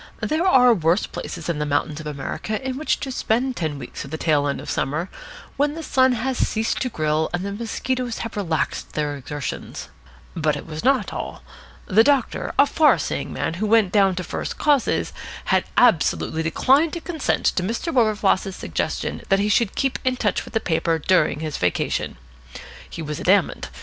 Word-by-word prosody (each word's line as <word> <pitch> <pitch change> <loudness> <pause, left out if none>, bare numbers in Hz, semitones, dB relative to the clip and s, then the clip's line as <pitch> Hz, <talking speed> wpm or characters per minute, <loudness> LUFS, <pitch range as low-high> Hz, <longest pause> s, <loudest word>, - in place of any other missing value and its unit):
There 320 +4 +1
are 250 -8 +6
worse 170 0 +2
places - - -7
than 170 -3 -2
the 150 - 0
mountains 145 +1 -1
of 155 - -7
America 150 +9 -4
in 260 - -2
which 305 +3 0
to 270 - -3
spend 250 +1 0
ten 155 -7 -2
weeks 125 -3 -7
of 140 - -9
the 160 - -4
tail 150 -3 +2
end 140 - -2
of - - -9
summer, 155 +7 -2 0.5
when 290 +1 +1
the 325 - -6
sun 260 -3 +3
has 250 +2 -2
ceased 220 +1 0
to 255 - 0
grill 155 -4 0
and 180 +2 -3
the 200 - -3
mosquitoes 235 +3 -3
have 230 - -7
relaxed 170 -6 -2
their 150 -1 -1
exertions. 145 +1 -6 0.5
But 155 -3 +1
it 145 - -7
was 155 -1 -6
not 260 -6 +2
all. - - -6 0.4
The 215 +4 +5
doctor, 275 -2 +1
a 280 - +7
far 305 +1 +4
seeing - - -3
man - - -2
who 215 - +1
went 215 -3 +4
down 195 -3 +4
to 180 - -3
first - - -4
causes, 290 -4 +1 0.3
had - - +2
absolutely 165 -7 +3
declined 270 - +3
to 340 - -3
consent 330 -3 -2
to - - +1
Mr. 230 - -2
Wilberfloss's 210 -5 +2
suggestion 85 - -3
that 195 - +5
he 205 +1 +1
should 210 -1 +2
keep 270 -1 0
in 255 0 +1
touch 210 -5 0
with - - -12
the - - +4
paper 165 -3 0
during 155 -2 +2
his 155 -2 -3
vacation. 90 -7 -1 0.7
He 165 - -6
was 150 -1 -4
adamant. 195 +2 +2
200 Hz, 190 wpm, -22 LUFS, 155-255 Hz, 0.7 s, a